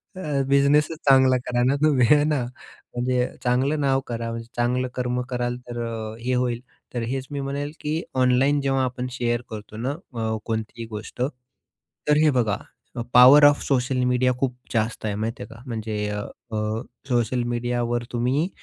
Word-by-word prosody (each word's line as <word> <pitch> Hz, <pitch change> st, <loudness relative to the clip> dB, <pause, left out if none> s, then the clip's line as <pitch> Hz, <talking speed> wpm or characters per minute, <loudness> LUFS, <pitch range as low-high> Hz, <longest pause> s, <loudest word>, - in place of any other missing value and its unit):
अ, 150 Hz, -7 st, -1 dB
बिझनेसच 140 Hz, +3 st, +3 dB
चांगला 130 Hz, -1 st, +6 dB
करा 120 Hz, 0 st, +1 dB
ना 130 Hz, +3 st, +3 dB
तुम्ही 135 Hz, -6 st, +4 dB
हे 150 Hz, -1 st, +6 dB
ना. 150 Hz, -4 st, +1 dB, 0.5 s
म्हणजे 125 Hz, 0 st, +1 dB, 0.2 s
चांगलं 130 Hz, +5 st, +1 dB
नाव 135 Hz, -1 st, +3 dB
करा. 115 Hz, -1 st, -3 dB, 0.2 s
चांगलं 125 Hz, +1 st, +1 dB
कर्म 125 Hz, 0 st, -1 dB
कराल, 120 Hz, -1 st, -2 dB
तर 120 Hz, 0 st, -5 dB
अ, 110 Hz, -1 st, -5 dB
हे 125 Hz, +2 st, -1 dB
होईल. 125 Hz, -1 st, 0 dB, 0.3 s
तर 120 Hz, -, -2 dB
हेच 130 Hz, +1 st, -3 dB
मी 145 Hz, -, -3 dB
म्हणेल 140 Hz, +1 st, -3 dB
की 155 Hz, +2 st, -2 dB, 0.2 s
ऑनलाईन 130 Hz, +3 st, +3 dB
जेव्हा 135 Hz, -1 st, +1 dB
आपण 125 Hz, 0 st, -2 dB
शेअर 120 Hz, -1 st, -1 dB
करतो 105 Hz, -1 st, -8 dB
ना 125 Hz, +5 st, -1 dB
अ, 115 Hz, -, -4 dB
कोणतीही 115 Hz, +1 st, -4 dB
गोष्ट. 110 Hz, +2 st, -7 dB, 0.9 s
तर 150 Hz, -, +5 dB
हे 155 Hz, -, +6 dB
बघा 105 Hz, -4 st, +1 dB, 0.4 s
अ, 120 Hz, -, -3 dB
पॉवर 130 Hz, +4 st, +9 dB
ऑफ 145 Hz, 0 st, +5 dB
सोशल 130 Hz, -1 st, +1 dB
मीडिया 125 Hz, 0 st, +2 dB
खूप 130 Hz, -2 st, 0 dB, 0.2 s
जास्त 110 Hz, -1 st, -1 dB
आहे 105 Hz, -2 st, -1 dB
माहिती 115 Hz, +5 st, -3 dB
आहे -, -, -11 dB
का. 115 Hz, -, -13 dB
म्हणजे 110 Hz, -2 st, -3 dB
अ, 105 Hz, 0 st, -3 dB, 0.3 s
अ, 105 Hz, +1 st, -1 dB, 0.3 s
सोशल 120 Hz, 0 st, +1 dB
मीडियावर 120 Hz, 0 st, -1 dB
तुम्ही 125 Hz, +7 st, +1 dB
125 Hz, 170 wpm, -24 LUFS, 120-135 Hz, 0.9 s, पॉवर